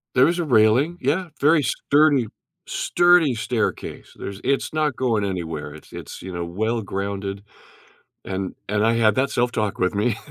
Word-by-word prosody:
There 125 - +6
was 170 +2 +1
a - - +1
railing, 125 +5 +3
yeah, 165 +7 0
very 150 +1 +4
sturdy, 140 +1 +2 0.4
sturdy 175 -5 +3
staircase, 110 - -3
there's 100 0 -7
it's 135 +1 0
not 155 -4 0
going 115 -6 0
anywhere, 80 -6 -4
it's 80 - -14
it's, - - -9
you 95 - -7
know, 85 0 -3
well-grounded, 100 0 -3 0.8
and 95 0 -4
and 105 +2 +1
I 115 - +3
had 110 -2 +3
that 130 +3 +1
self-talk 120 -4 -1
with 90 +2 +1
me. 105 +2 +1
115 Hz, 155 wpm, -22 LUFS, 100-140 Hz, 0.8 s, There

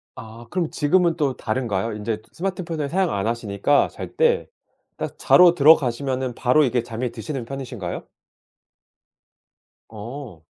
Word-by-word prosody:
아 115 0 -11
그럼 175 -3 -1
지금은 170 +2 +2
또 140 -5 0
다른가요? 110 -2 -2
인제 105 +1 -3
또 - - -27
스마트폰을 170 -5 -3
사용 185 +2 +1
안 100 +1 -1
하시니까 115 +4 +1
잘 - - -9
때 475 0 +2 0.5
딱 - - -5
자러 180 -1 +6
들어가시면은 130 -4 +3
바로 135 +5 +3
이게 120 -1 0
잠이 120 +1 -4
드시는 125 +2 -5
편이신가요? 125 -8 -6 1.9
어. 115 - -9
130 Hz, 295 characters per minute, -22 LUFS, 115-155 Hz, 1.9 s, 자러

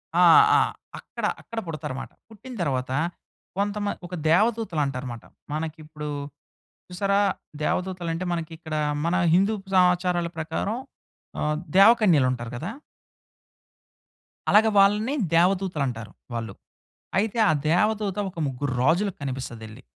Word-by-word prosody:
ఆ! - - +6 0.3
ఆ! - - +5 0.4
అక్కడ, - - -6 0.2
అక్కడ 230 0 -6
పుడతారు 150 -4 -5
మాట. - - -9 0.2
పుట్టిన 225 +4 -11
తర్వాత 130 -4 -2 0.7
కొంతమన్ 205 0 -1
ఒక 180 - -6
దేవదూతలు 210 -1 +2
అంటారు 130 -1 -4
మాట. 115 - -11 0.3
మనకి 155 +1 -3
ఇప్పుడు 150 -1 -8 0.8
చూసారా 200 +2 +1 0.4
దేవదూతలు 180 +1 -1
అంటే 175 +3 -3
మనకి 165 -1 -3
ఇక్కడ, 160 -2 -6 0.3
మన 170 +1 +1 0.2
హిందూ 195 +4 +3 0.2
సమాచారాల 180 -1 +3
ప్రకారం 180 +7 -2 0.6
ఆహ్, 150 0 0 0.2
దేవకన్యలు 195 - +6
ఉంటారు 120 -2 -5
కదా! 165 +10 -4 1.8
అలాగ 215 +2 +6
వాళ్ళని 210 +6 +3 0.2
దేవదూతలు 180 -2 +2
అంటారు, 115 -3 -6 0.2
వాళ్ళు. 115 -4 -4 0.7
అయితే 220 +3 0
ఆ - - +5 0.2
దేవదూత 205 +3 +1
ఒక 175 - -15
ముగ్గురు 135 0 -3
రాజులకి 175 +7 +1
కనిపిస్తదెల్లి. 125 -3 -6
175 Hz, 120 wpm, -25 LUFS, 145-200 Hz, 1.8 s, ఆ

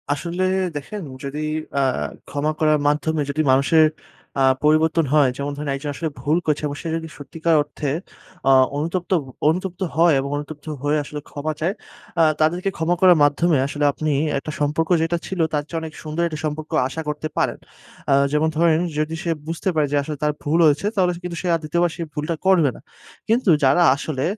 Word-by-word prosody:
আসলে 170 +5 -2 0.3
দেখেন 175 +9 -5 0.2
যদি 140 +2 -4 0.4
আ - - +3 0.5
ক্ষমা 145 +2 -1
করার 155 -1 +3
মাধ্যমে 150 +1 +1
যদি 145 +2 0
মানুষের 140 +4 +5 0.5
আ - - +2 0.2
পরিবর্তন 155 +1 +3
হয়, 145 -4 +5
যেমন 140 +1 -3
ধরেন 150 0 -4
একজন 145 +2 -5
আসলে 160 +3 -2
ভুল 150 +5 +2
করছে। 150 -1 0
এবং 145 - -5
সে - - -6
যদি 165 0 -6
সত্যিকার 160 +3 -1
অর্থে 150 0 -5 0.6
আ - - +7 0.3
অনুতপ্ত 170 +5 -3 0.4
অনুতপ্ত 180 +3 -2
হয় 165 0 +5
এবং 135 +1 -3
অনুতপ্ত 145 0 -8 0.2
হয়ে 145 +1 +2
আসলে 150 +1 -6
ক্ষমা 150 +2 -3
চায়। 170 +5 0 0.5
আ - - +7 0.2
তাদেরকে 175 +5 +1
ক্ষমা 165 +2 +1
করার 180 -2 +7
মাধ্যমে 150 +2 +3
আসলে 145 +1 -1
আপনি 155 +2 -2 0.3
একটা 145 +3 -5
সম্পর্ক 150 +2 0
যেটা 165 +1 0
ছিল, 190 - -5
তার 145 -1 0
চেয়ে 165 - -2
অনেক 160 -1 -7
সুন্দর 155 +2 -3
একটা 155 -2 -6
সম্পর্ক 155 +1 -4 0.2
আশা 160 +5 -5
করতে 150 +1 -3
পারেন। - - +1 0.5
আ - - +6 0.2
যেমন 150 +1 +2
ধরেন 165 -1 +4 0.2
যদি 155 +1 -1
সে 170 - 0 0.2
বুঝতে 165 +3 -2
পারে 150 -2 +2
যে 145 - +2
আসলে 150 +1 -5
তার 150 - +3
ভুল 155 +3 +1
হয়েছে 150 +4 +3
তাহলে 185 -3 +3
কিন্তু 175 -1 -5
সে 185 - -3
আর - - -2
২য় 165 +3 0
বার 175 - +2
সেই 170 - -4
ভুলটা 150 +3 -2
করবে 180 -6 +5
না। - - -13 0.5
কিন্তু 225 -1 +2
যারা 140 +6 +5
আসলে 140 -1 -3
155 Hz, 190 wpm, -21 LUFS, 145-170 Hz, 0.6 s, আ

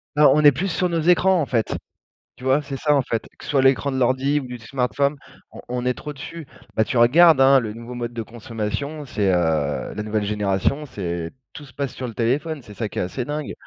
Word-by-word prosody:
Ben, 150 0 +6
on 150 +1 +3
est 145 - +9
plus 175 +8 -2
sur 180 +1 0
nos 165 -1 0
écrans, 180 +2 +4
en - - 0
fait. 115 -4 -1 0.6
Tu - - -15
vois? 130 +3 +3
C'est 140 -2 -6
ça, 150 +2 +2
en 140 - +3
fait. 115 -3 -2
Que - - -14
ce - - -4
soit 140 -2 +3
l'écran 135 +1 +3
de 130 - -2
l'ordi 130 +3 +2
ou 135 - -7
du 125 0 -7
smartphone, 135 +4 -1 0.4
on - - -11
on 125 0 -3
est 125 - +2
trop 150 - -7
dessus. 160 +4 -8 0.3
Ben, 110 - +3
tu 120 - -2
regardes, 150 +6 +6
hein, 135 0 +7
le 110 -4 -4
nouveau 115 +2 -9
mode 120 -1 -4
de 115 - -4
consommation, 120 +6 -5
c'est, 105 -6 0
heu, 80 -5 0
la 105 - -3
nouvelle 105 0 -1
génération, 105 +7 0
c'est 85 - -4 0.2
tout 145 - -10
se 135 - -17
passe 140 -2 -3
sur 130 - -4
le 115 - -7
téléphone. 140 +7 -1
C'est 105 -4 -13
ça 110 -1 -3
qui - - -5
est - - +1
assez 105 +8 -3
dingue 150 +1 -4
130 Hz, 245 wpm, -22 LUFS, 110-145 Hz, 0.6 s, est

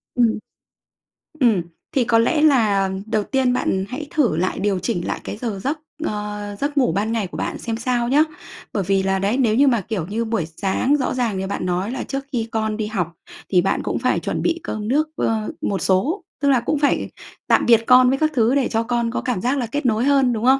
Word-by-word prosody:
Ừm. 235 -3 +2 1.0
Ừm, 230 - +4 0.3
thì 265 - +2
có 230 0 +3
lẽ 295 +7 +2
là 215 -10 +3 0.2
đầu 215 -1 0
tiên 260 +1 +1
bạn 190 -6 0
hãy 285 +4 -5
thử 240 - +2
lại, 185 +2 -1
điều 195 -1 0
chỉnh 175 0 -2
lại - - -2
cái - - -6
giờ 220 -4 -4
giấc, 295 +4 -1 0.2
ờ, 210 -4 -4
giấc 290 +1 -2
ngủ 255 -10 +3
ban 205 +5 0
ngày 225 -4 -1
của - - -9
bạn - - -3
xem 225 -1 -3
sao 240 0 0
nhá. 285 +5 +4 0.5
Bởi 200 - 0
vì 195 -1 +2
là, 190 0 +1
đấy, 200 +6 0
nếu 230 -5 +2
như 280 +4 +5
mà, 235 -5 +3
kiểu 185 -4 -4
như 225 +4 -2
buổi 220 -7 -1
sáng 195 - 0
rõ 260 -2 -1
ràng 240 -6 -1
như 190 0 -3
bạn 200 - -3
nói 180 +4 -1
là 260 - -3
trước 275 0 -4
khi 230 -3 -1
con 220 -1 -1
đi 215 -1 -2
học, 180 -6 -2 0.4
thì 180 -2 +4
bạn 195 - 0
cũng - - -2
phải - - +1
chuẩn - - -3
bị 340 0 0
cơm 215 -1 -4
nước, 295 +6 +2
ơ, 220 -1 -1
một 195 -3 -1
số, 275 - +1 0.2
tức 285 - +3
là 265 -3 +4
cũng 270 +5 -1
phải 285 - +1 0.4
tạm - - +3
biệt 230 -2 +6
con 250 0 +7
với 270 - +1
các 310 +2 +1
thứ, 235 +1 +3
để 275 -3 +2
cho 225 0 0
con 235 0 -1
có - - -2
cảm 240 -8 -2
giác 255 +4 0
là 250 - -1
kết 290 +5 -3
nối 225 -1 +2
hơn, 275 -3 +3
đúng 225 +1 -2
không? 265 +1 +5
230 Hz, 240 wpm, -21 LUFS, 205-260 Hz, 1.0 s, con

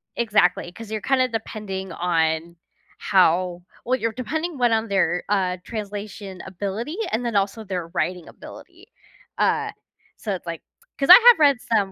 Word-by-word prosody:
Exactly, 205 -6 +1
'cause 225 +3 -11
you're 215 -1 -3
kinda 260 +1 +2
depending 210 -5 -5
on 165 -1 -1 0.4
how 180 -1 +2 0.2
well, 255 +1 0
you're 230 0 -1
depending 315 +7 -4
1 245 -2 +2
on 225 0 +1
their, 195 -3 +1
uh, 190 -3 0
translation 205 -3 -7
ability 200 - -5 0.2
and 230 +3 -1
then 235 -3 -2
also 200 +3 0
their 180 -4 -4
writing 175 0 -3
ability. 350 +6 -14 0.5
Uh, - - +1 0.4
so 210 - -4
it's 180 - -10
like 165 -1 -5 0.4
'cause 275 - -1
I - - +15 0.2
have 440 - -3
read 285 -4 +4
some 205 -4 0
205 Hz, 155 wpm, -23 LUFS, 180-235 Hz, 0.5 s, I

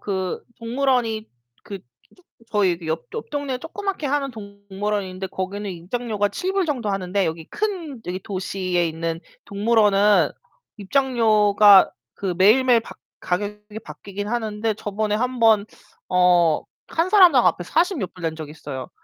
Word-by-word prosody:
그 190 -3 -3 0.2
동물원이 235 -2 0 0.3
그 200 -1 -7 0.4
쪼 365 - -25 0.3
저희 195 -5 +2
그 165 - -10
옆 160 +1 -3
옆동네에 285 - -4
조그맣게 375 +1 -4
하는 275 -1 -1
동물원인데 200 -2 -5
거기는 195 +2 -4
입장료가 205 +4 -2
$7 375 - -1
정도 250 -8 -2
하는데 195 0 -1
여기 160 0 -3
큰 360 - -4
여기 180 +1 -3
도시에 185 -2 -2
있는 165 +1 -4 0.2
동물원은 210 -1 +3 0.5
입장료가 210 -4 +4 0.2
그 190 -3 -3
매일매일 230 +5 +5
바 - - -11 0.3
가격이 210 +3 -4
바뀌긴 200 +1 -7
하는데 220 -2 -2
저번에 210 0 -2
1 250 +3 -1
번 220 -2 +4 0.4
어 180 -3 +3 0.3
1 330 +3 0
사람당 360 - +6
앞에 175 - +1
40 350 - +1
몇 190 - -4
불 180 - -14
낸 160 -1 -2
적이 155 -2 -7
있어요. 140 -4 -7
210 Hz, 280 characters per minute, -22 LUFS, 185-245 Hz, 0.5 s, 사람당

